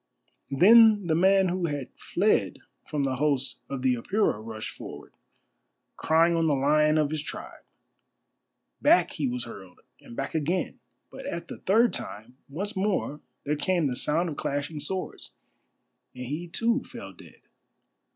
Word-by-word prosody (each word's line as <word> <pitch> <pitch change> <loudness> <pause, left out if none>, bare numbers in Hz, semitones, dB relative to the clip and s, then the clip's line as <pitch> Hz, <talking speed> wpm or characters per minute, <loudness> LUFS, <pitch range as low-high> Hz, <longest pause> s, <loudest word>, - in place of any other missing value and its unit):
Then 210 +7 +6
the 165 - +1
man 190 +3 +4
who 180 -1 -1
had 145 -4 -4
fled 175 - +1 0.3
from 150 -2 -1
the 130 -2 -1
host 135 -3 0
of 135 -2 -4
the 130 -1 +3
Apura 125 - 0
rushed 110 -1 -6
forward, - - -10 0.8
crying 165 +2 +3
on 165 -1 +2
the 150 - +3
Lion 150 +3 +3
of 150 -1 +1
his 155 -1 -2
tribe. - - -8 1.2
Back 325 +5 +4
he 150 -6 -2
was 125 -1 -3
hurled, 95 -6 -11 0.2
and 120 - -13
back 135 +5 -4
again, 165 +4 -1 0.3
but - - -8
at 170 0 -5
the - - -8
third 225 +5 +3
time 110 +5 -6
once 200 +9 -4
more 190 -6 -1 0.2
there 150 +1 0
came 175 +1 +1
the 130 -3 -1
sound 160 +7 0
of 150 -4 -5
clashing 145 +2 -3
swords, 190 +5 -4 0.8
and 125 0 -6
he 150 +7 -4
too 230 +9 0
fell - - -10
dead. - - -16
155 Hz, 155 wpm, -27 LUFS, 135-185 Hz, 1.2 s, Then